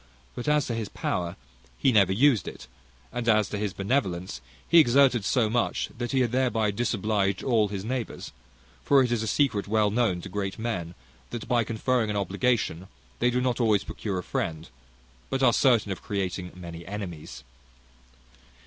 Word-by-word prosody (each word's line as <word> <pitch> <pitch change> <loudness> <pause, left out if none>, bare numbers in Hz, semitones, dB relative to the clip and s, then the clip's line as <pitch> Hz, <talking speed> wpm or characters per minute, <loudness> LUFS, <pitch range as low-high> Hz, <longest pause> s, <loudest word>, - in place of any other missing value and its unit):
But 120 - -6
as 150 -1 +3
to 120 - -3
his 115 -3 -3
power, 85 -1 -3 0.4
he 135 - +3
never 100 -4 +4
used 120 +3 +3
it; - - -8 0.5
and 120 -1 -1
as 110 -2 +4
to 105 - -3
his 105 -2 -1
benevolence, 95 - -2 0.3
he 170 - +7
exerted 130 -4 +4
so 115 +2 +2
much, 120 +2 0
that 120 0 -4
he 135 - +2
had 120 -3 +1
thereby 120 -4 +1
disobliged 100 -3 0
all 115 -5 +2
his 100 -1 -5
neighbours; 125 0 -4 0.5
for 140 -2 +5
it 125 - -1
is 120 -2 +1
a 110 - -3
secret 110 -5 +1
well 105 -1 +2
known 110 -5 +1
to - - -8
great 95 0 -4
men, 90 -7 -4 0.3
that, 120 - -6
by 120 -1 +2
conferring 115 +1 0
an 105 - -1
obligation, 100 -2 0 0.3
they 120 - +3
do 125 +1 0
not 125 -1 0
always 105 -4 +3
procure 100 -4 -4
a 90 - -3
friend, 80 -1 -3 0.6
but 135 0 -1
are 120 -2 +5
certain 115 -7 +3
of 95 - -5
creating 95 -3 -3
many 85 -2 -8
enemies. 90 -8 -7
110 Hz, 175 wpm, -26 LUFS, 95-120 Hz, 0.6 s, he